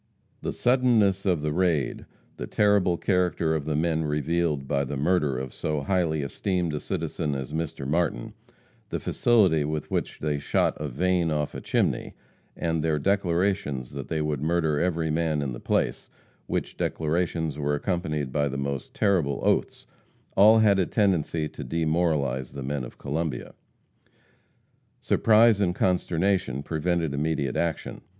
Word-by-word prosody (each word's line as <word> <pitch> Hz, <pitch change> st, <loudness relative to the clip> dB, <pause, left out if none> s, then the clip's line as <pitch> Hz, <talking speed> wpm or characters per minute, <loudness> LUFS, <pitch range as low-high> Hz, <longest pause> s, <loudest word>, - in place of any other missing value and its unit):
The -, -, -2 dB
suddenness 115 Hz, -6 st, +2 dB
of 85 Hz, -5 st, +1 dB
the 75 Hz, -1 st, -1 dB
raid; 85 Hz, -5 st, 0 dB, 0.3 s
the -, -, -5 dB
terrible 100 Hz, -4 st, +3 dB
character 90 Hz, -4 st, +1 dB
of 75 Hz, -3 st, -2 dB
the 75 Hz, -1 st, -1 dB
men 80 Hz, +1 st, +1 dB
revealed 75 Hz, -1 st, 0 dB
by 70 Hz, 0 st, +1 dB
the 70 Hz, +1 st, -4 dB
murder 75 Hz, -3 st, +1 dB
of 65 Hz, 0 st, -5 dB
so 75 Hz, -2 st, -2 dB
highly 80 Hz, -2 st, 0 dB
esteemed 85 Hz, +3 st, -1 dB
a 75 Hz, -, -2 dB
citizen 75 Hz, -1 st, -3 dB
as 65 Hz, +2 st, -5 dB
Mr. 80 Hz, -4 st, -3 dB
Martin; 80 Hz, -5 st, -1 dB, 0.6 s
the -, -, -2 dB
facility 95 Hz, -10 st, +3 dB
with 75 Hz, 0 st, -4 dB
which -, -, -2 dB
they 75 Hz, -1 st, -1 dB
shot -, -, +1 dB
a 75 Hz, -, -2 dB
vane 85 Hz, +5 st, +1 dB
off 75 Hz, -2 st, -1 dB
a -, -, -6 dB
chimney, -, -, -1 dB, 0.4 s
and 80 Hz, -2 st, -1 dB
their 80 Hz, -2 st, +1 dB
declarations 90 Hz, -6 st, 0 dB
that 70 Hz, -1 st, -6 dB
they 80 Hz, -2 st, -1 dB
would 75 Hz, -3 st, -2 dB
murder 80 Hz, -2 st, +1 dB
every 85 Hz, -2 st, 0 dB
man 80 Hz, -1 st, 0 dB
in 65 Hz, -3 st, -3 dB
the -, -, -7 dB
place, -, -, -1 dB, 0.4 s
which -, -, -3 dB
declarations 80 Hz, -1 st, -1 dB
were 75 Hz, 0 st, 0 dB
accompanied 75 Hz, -5 st, -2 dB
by 70 Hz, +1 st, +1 dB
the 70 Hz, 0 st, -4 dB
most 70 Hz, -1 st, -4 dB
terrible 85 Hz, -9 st, +1 dB
oaths, -, -, 0 dB, 0.5 s
all 110 Hz, +3 st, +7 dB
had 105 Hz, -3 st, +4 dB
a 90 Hz, -, +1 dB
tendency 85 Hz, -6 st, +1 dB
to -, -, -8 dB
demoralize 80 Hz, -6 st, 0 dB
the 70 Hz, -, -6 dB
men 70 Hz, 0 st, -2 dB
of -, -, -9 dB
Columbia. 75 Hz, -3 st, -3 dB, 1.5 s
Surprise 110 Hz, -1 st, +4 dB
and 90 Hz, -2 st, +1 dB
consternation 90 Hz, -6 st, 0 dB
prevented 80 Hz, -1 st, -1 dB
immediate 70 Hz, -2 st, -1 dB
action. 85 Hz, -2 st, -2 dB
80 Hz, 155 wpm, -26 LUFS, 75-90 Hz, 1.5 s, all